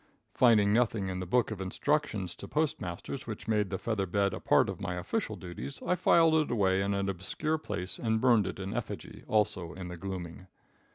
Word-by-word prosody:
Finding 105 -5 +5
nothing 110 -4 +1
in 90 0 -3
the 95 - -4
book 120 +4 +2
of 100 -3 -5
instructions 95 - -1
to - - -9
postmasters 140 - -3
which - - -6
made 105 -3 +1
the 95 - -2
feather 105 -2 -1
bed 100 +2 +1
a - - -4
part - - +4
of - - -5
my 90 -3 -2
official 90 - -2
duties, 90 +10 -7
I - - +2
filed 170 -2 +4
it 155 -1 +3
away 95 -4 +2
in 100 +1 0
an 100 0 -1
obscure 100 - -1
place 90 - -5
and 110 -2 +1
burned 120 -4 +4
it - - -5
in 95 0 -4
effigy, - - -5
also 95 -5 +1
in 90 -1 -7
the 90 - -7
gloaming. 90 -1 -6
100 Hz, 205 wpm, -30 LUFS, 95-115 Hz, -, Finding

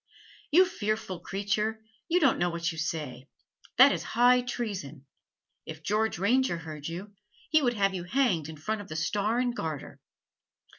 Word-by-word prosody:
"You 360 +5 +6
fearful 215 - -3
creature, 205 +4 -1 0.3
you 350 +2 +4
don't 280 -8 +3
know 175 0 +2
what 170 0 -2
you 160 - -9
say. 150 -5 -4 0.5
That 265 +3 +9
is - - -1 0.2
high 250 +1 +6
treason. 200 - -5 0.6
If 160 0 -8
George 215 +3 0
Ranger 235 +2 +2
heard 155 -3 -7
you, 185 +5 -7 0.4
he 310 - +5
would 245 -3 +1
have 195 -2 +2
you 180 -2 -4
hanged 185 - +1
in 160 - -8
front 215 +8 -3
of 205 - -11
the 155 - -7
Star 205 +7 0
and 245 -1 0
Garter." 155 - -5
200 Hz, 165 wpm, -28 LUFS, 165-240 Hz, 0.6 s, That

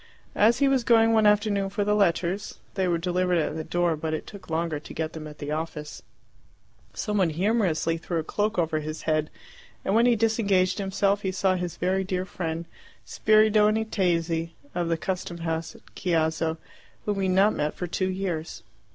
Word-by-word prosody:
As 225 +3 +4
he 280 - +3
was 270 -2 +2
going 225 -1 +5
one 220 -1 +5
afternoon 205 -1 +2
for 205 +1 -1
the 210 +1 +1
letters 195 0 0 0.2
they 190 -2 0
were 175 -1 +2
delivered 180 +1 +1
at 155 -1 -1
the 160 - -3
door, 175 0 +1
but 155 +1 -2
it - - -6
took 200 -4 -12
longer 160 -1 -1
to - - -11
get 160 0 -3
them 155 -1 -7
at 150 0 -11
the 145 0 -5
office 155 -1 -5 0.9
some 210 -1 -2
one 185 -3 +3
humorously 175 -2 +1
threw 170 0 -3
a 160 - -1
cloak 210 +6 -1
over 160 -2 +1
his 155 +1 -6
head, 155 -1 0 0.6
and 195 - +1
when 230 +3 +5
he 240 - +4
disengaged 205 -5 +2
himself 200 +1 +1
he 190 - -1
saw 190 0 +1
his 180 -2 -3
very 190 +2 0
dear 185 0 -2
friend 165 -3 -4 0.4
Spiridione 215 0 +3
Tesi 170 -5 0 0.2
of 175 -1 -1
the 165 - +1
custom 180 0 -4
house 165 -1 -3
at - - -17
Chiasso, 160 -2 0 0.5
whom 205 -1 -1
he 190 - +1
had 185 - +1
not 200 +3 +5
met 150 +1 -1
for 180 - -4
two 185 +2 -1
years. 180 -6 -4
185 Hz, 195 wpm, -26 LUFS, 165-205 Hz, 0.9 s, going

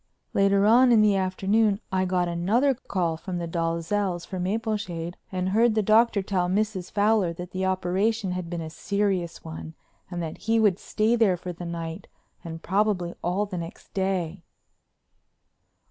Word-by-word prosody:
Later 195 0 +3
on 245 +4 +6
in 225 -2 +6
the 210 -2 +4
afternoon 195 +2 +1
I 185 0 +1
got 180 -1 +1
another 205 +11 +2
call 180 -9 -2
from 180 +2 -5
the 170 -1 -3
Dalzells' 170 +2 -1
for 185 - -5
Mapleshade 185 -4 -2 0.2
and 185 0 -1
heard 225 +3 +3
the 215 - +2
Doctor 215 0 +4
tell 185 -2 0
Mrs. 195 -2 -1
Fowler 205 -4 +2
that 175 +2 -8
the 190 0 -1
operation 190 +3 0
had 180 -2 -4
been 170 -1 -4
a 160 -1 -6
serious 195 -2 -1
one 160 0 -8 0.3
and 175 -2 -5
that 165 -2 -5
he 225 +1 +1
would 205 -4 +3
stay 220 +2 +1
there 210 -6 +3
for 180 +1 -6
the 175 +1 -8
night 165 +1 -5 0.4
and 165 -1 -7
probably 190 -3 +1
all 185 +4 0
the 190 -3 -5
next 170 +2 -9
day. 190 -2 -1
190 Hz, 165 wpm, -26 LUFS, 175-210 Hz, 0.4 s, on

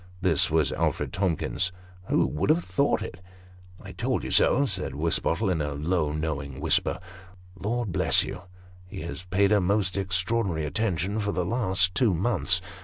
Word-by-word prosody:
This 90 -6 +2
was 75 -4 +2
Alfred - - -1
Tomkins. 90 0 0 0.2
" 90 0 -22
Who - - +3
would 75 - -2
have 165 +3 +3
thought 140 0 +1
it? 90 0 -8 0.3
" 90 0 -22
"I - - -9
told - - -2
you - - -4
so," 140 +3 +4
said 90 - -3
Wisbottle, 85 +5 0
in 80 -4 0
a 75 -1 -3
most 75 0 0
knowing 75 -4 -4
whisper. - - +1 0.3
" 90 -1 -23
Lord 115 -1 -1
bless - - +3
you, - - -6 0.5
he 90 - -8
has 85 +2 -7
paid 95 +2 +2
her 105 -2 +4
most 100 +1 +1
extraordinary 95 -2 0
attention 100 +2 -1
for 100 -1 -1
the 90 -3 -1
last 95 -4 +1
two 110 -7 +2
months. 95 -1 +1
90 Hz, 180 wpm, -26 LUFS, 85-100 Hz, 0.5 s, so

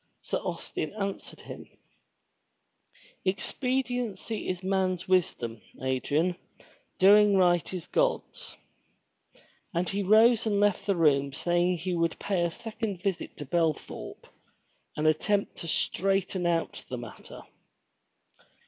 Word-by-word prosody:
Sir - - -2
Austin 155 - -4
answered 200 -2 -5
him: - - -10 1.5
"Expediency 245 +1 -2
is 185 0 -3
man's 185 -2 0
wisdom, 120 - 0 0.2
Adrian. 145 +7 0 0.6
Doing 205 +1 +6
right 175 -2 +3
is 180 -3 -5
God's." - - -1 1.2
And 175 +1 +1
he 200 +1 -1
rose 220 +3 +5
and 205 -2 +2
left 205 -1 +2
the 200 - +3
room 140 -4 +3
saying 175 +3 +1
that 170 - -5
he 180 +1 -2
would 165 -1 0
pay 195 -4 -1
a 170 - +2
second 215 -1 -5
visit 195 -4 -2
to 145 - -6
Belthorpe, 160 +1 -2 0.7
and 150 - -1
attempt 200 +6 +1
to 170 - -5
straighten 190 +1 +1
out 170 -1 -1
the 125 - -3
matter. 120 -2 -10
185 Hz, 120 wpm, -28 LUFS, 165-205 Hz, 1.5 s, Doing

